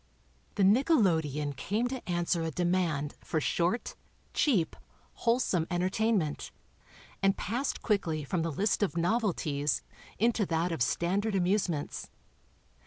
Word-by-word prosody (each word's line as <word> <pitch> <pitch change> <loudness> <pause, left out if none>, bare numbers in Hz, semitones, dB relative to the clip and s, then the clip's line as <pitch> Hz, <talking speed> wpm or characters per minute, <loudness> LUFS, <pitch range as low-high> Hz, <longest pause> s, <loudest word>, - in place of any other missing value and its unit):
The 200 - +2
nickelodeon 175 - +3
came 210 - 0
to 260 -6 -6
answer 175 0 +1
a 165 - -1
demand 170 -4 0
for 160 - -1
short, 175 - 0 0.4
cheap, 205 - +2 0.4
wholesome 230 -8 +1
entertainment, 185 -1 0 0.7
and 195 0 +3
passed 250 +5 -2
quickly 165 -8 0
from 165 +4 -1
the 165 0 -1
list 195 +8 0
of 195 -4 0
novelties 170 -7 0 0.3
into 230 0 +2
that 165 +2 0
of 165 - -3
standard 195 - +1
amusements. 180 -5 0
180 Hz, 115 wpm, -30 LUFS, 160-210 Hz, 0.7 s, nickelodeon